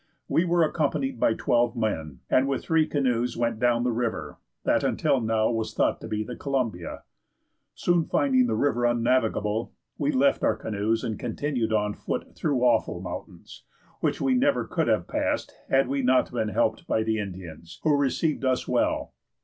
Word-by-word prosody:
We 170 - +2
were 170 -1 +3
accompanied 145 -5 -1
by 110 - +3
twelve 120 -1 +1
men, 80 - -2
and 130 +1 +3
with 135 -1 -1
three 160 -1 +2
canoes 125 -4 0
went 115 -2 -1
down 120 0 +2
the 125 - +1
river, 115 -1 -3 0.2
that - - +2
until 130 - +1
now 110 0 +1
was 115 -1 -3
thought - - +1
to - - -7
be 110 0 -2
the 125 +3 -7
Columbia. 120 - -3 0.7
Soon 175 -2 +2
finding 130 -3 +2
the 110 - 0
river 120 0 +1
unnavigable, 115 -2 +1 0.3
we 295 - +1
left 280 0 +2
our - - +3
canoes 110 +1 -1
and 110 -2 -3
continued 120 -1 -2
on 105 -1 +1
foot - - -5
through 135 -5 -1
awful 115 -7 +2
mountains, 90 -1 -8 0.4
which - - 0
we 265 - +2
never 275 +3 +2
could - - -1
have - - +1
passed - - -1 0.2
had 135 0 +3
we 140 0 -1
not 130 0 +3
been 110 -3 -1
helped 110 +1 0
by 110 - +1
the 110 0 0
Indians, 90 -5 -8
who 155 -2 +4
received 145 +2 0
us 130 -1 0
well. - - 0
120 Hz, 175 wpm, -26 LUFS, 110-140 Hz, 0.7 s, who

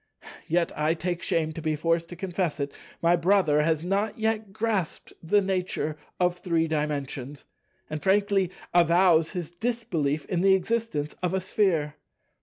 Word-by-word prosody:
Yet—I 160 -1 +1
take 175 +1 -3
shame 160 -1 0
to 160 - -7
be 155 0 0
forced 165 +2 0
to 175 - -7
confess 175 -3 -2
it—my 165 +4 -1
brother 170 -4 +3
has 160 0 +1
not 200 +3 0
yet 220 -2 -1
grasped 210 -5 -2
the 200 +5 +3
nature 185 -5 -2 0.2
of 180 0 +1
Three 165 -3 +1
Dimensions, 145 -3 -3 0.4
and 155 -1 -5
frankly 195 0 +2 0.2
avows 170 -1 +4
his 175 -4 -4
disbelief 175 -8 -2
in 175 -2 -1
the 190 0 +6
existence 190 -7 -1
of 180 +1 0
a - - +1
Sphere. 180 -6 0
175 Hz, 145 wpm, -26 LUFS, 155-195 Hz, 0.4 s, the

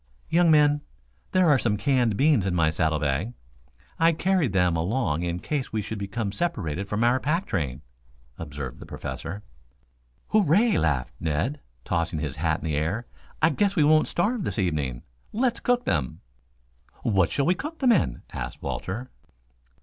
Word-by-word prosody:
"Young 170 0 +4
men, 150 -1 +5 0.5
there 185 -2 +4
are 145 -4 +5
some 105 -4 +1
canned 120 -1 +1
beans 140 -9 +3
in 90 - 0
my 80 -2 +3
saddle 80 -1 +1
bag. 75 - -1 0.7
I 165 +1 +5
carried 175 - +1
them 90 -3 +2
along 85 - 0
in 85 0 -2
case 140 +5 -3
we 110 -1 -1
should 110 +1 -5
become 100 +1 -3
separated 100 - -2
from 105 +2 0
our 120 +2 +3
pack 165 +8 0
train," 70 -3 -3 0.6
observed 70 -5 -6
the - - -10
Professor. 100 +5 -6 0.9
"Hooray!" 210 +1 +4
laughed 70 -6 0
Ned, 85 - -1 0.3
tossing 85 -1 -1
his 75 -2 -4
hat 80 +1 0
in - - -6
the 80 -2 -1
air. 85 +11 -1 0.4
"I 165 - +6
guess 200 -1 +1
we 160 - +4
won't 155 +1 +5
starve 210 +4 0
this - - -2
evening. 75 - -1 0.3
Let's 240 +2 +1
cook 245 0 +1
them?" 70 -8 -1 0.8
"What 95 -8 +3
shall 140 - 0
we 180 - +4
cook 300 - -6
them 260 -5 +4
in?" 65 - +1
asked - - -6
Walter. 115 +7 -4
105 Hz, 165 wpm, -26 LUFS, -, 0.9 s, I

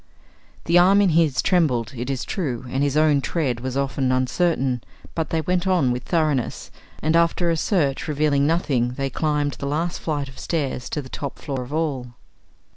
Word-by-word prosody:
The 170 +1 +5
arm 190 +3 +6
in 200 -2 +4
his 160 -4 +2
trembled, 130 - +1
it 120 +2 -4
is 135 -2 -2
true, 130 - -3
and 135 +2 -1
his 145 0 +1
own 155 -2 +4
tread 135 -6 -1
was 130 +1 -4
often 135 -1 0
uncertain, 130 -1 +1 0.3
but 160 -2 -2
they 160 - 0
went 180 +3 0
on 175 -9 +3
with 125 +1 -2
thoroughness, 155 -7 -1 0.3
and 155 +2 +2
after 170 +1 +3
a - - +1
search 155 -5 0
revealing 145 -1 +2
nothing 135 -7 +1
they 135 +1 -3
climbed 150 -2 0
the 140 - -3
last 165 +4 -1
flight 145 -3 -2
of 130 - -12
stairs 140 -6 -2
to 150 - -3
the - - -10
top 140 0 -5
floor 135 -3 -4
of 125 +2 -8
all. 140 -6 -2
145 Hz, 190 wpm, -23 LUFS, 130-165 Hz, 0.3 s, arm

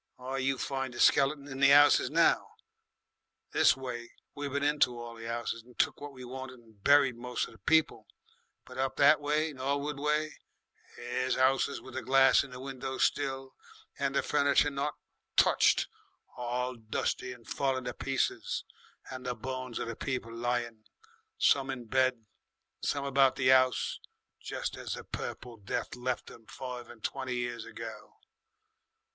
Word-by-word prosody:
Why, 130 +1 -4
you 135 +1 0
find 135 -2 -3
the - - -7
skeletons 140 0 +3
in 135 - -6
the 135 0 +6
'ouses 145 +1 +6
now. - - +2 1.0
This - - +4
way 120 -3 -6 0.2
we 145 0 -4
been 140 +1 -2
into 145 -5 +2
all 120 0 -7
the 115 0 -6
'ouses 115 0 -3
and 120 +1 -20
took - - +1
what 145 0 -6
we 130 -2 -10
wanted 130 +1 -7
and 110 -4 -22
buried 140 -3 +5
moce 125 +1 -2
of - - -13
the 110 - -18
people, 160 0 +2 0.6
but 125 0 -10
up 135 0 0
that 150 +2 +6
way, 150 +2 0
Norwood 140 +2 -2
way, 150 +1 0 0.6
there's 125 +2 -1
'ouses 135 +2 +2
with 130 - -12
the - - -3
glass 135 0 +5
in 140 - -10
the 125 0 -9
windows 135 0 -3
still, 135 -2 -1 0.5
and 140 -1 0
the - - +2
furniture 145 0 +3
not 140 +2 -2 0.4
touched - - +4 0.5
all 125 +1 -2
dusty 115 +2 -2
and 120 -2 -12
falling 135 -2 -1
to 125 0 -4
pieces 135 -1 -1 0.5
and 130 -1 -7
the 125 - -1
bones 130 -2 -5
of - - -3
the 115 - -4
people 125 -3 -4
lying, 120 -1 -2 0.5
some 135 -1 +3
in 130 -3 -4
bed, 130 -1 +1 0.6
some 140 -1 -1
about 135 -1 +4
the 130 -1 +3
'ouse, 130 -1 +2 0.4
jest - - -4
as - - -5
the - - -8
Purple 120 -2 -6
Death 100 +3 -4
left 125 0 -3
'em 115 - -15
five 125 -2 -7
and 110 - -14
twenty 130 -2 -3
years 120 -1 -3
ago. 110 -2 -9
130 Hz, 165 wpm, -30 LUFS, 120-140 Hz, 1.0 s, the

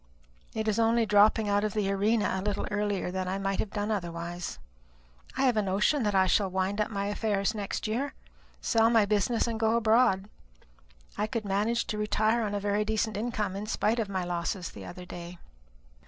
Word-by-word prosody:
It 220 0 -2
is 215 +1 +1
only 230 0 +3
dropping 210 +1 +4
out 205 0 +2
of 215 -1 -2
the 200 -2 +1
arena 210 +2 +1
a 190 - -1
little 205 0 -2
earlier 205 -3 -1
than 185 0 -3
I 190 +1 -1
might 195 0 -2
have 215 - -1
done 210 +1 -2
otherwise. 175 -3 -4 0.8
I 270 - +1
have 255 -3 +3
a - - +4
notion 205 +9 +1
that 210 -3 0
I 190 0 +5
shall 195 +1 +2
wind 190 +3 -1
up 210 - 0
my 200 -2 -2
affairs 205 0 0
next 205 -3 -4
year, 245 +6 -2 0.5
sell 225 -1 +3
my 225 -3 +4
business, 210 +3 +1
and 230 -2 -3
go 225 0 +2
abroad. 220 -3 +3 0.9
I 210 - +1
could 225 -2 -3
manage 210 +4 0
to 210 - -3
retire 215 +2 +1
upon 205 -2 -2
a - - 0
very 205 +1 0
decent 220 0 -1
income, 210 -3 -2
in 205 +2 -5
spite 225 +1 +1
of 215 -3 -1
my 190 -2 -2
losses 175 0 -3
the - - -10
other 180 0 -9
day." 175 0 -8
210 Hz, 200 wpm, -29 LUFS, 195-220 Hz, 0.9 s, I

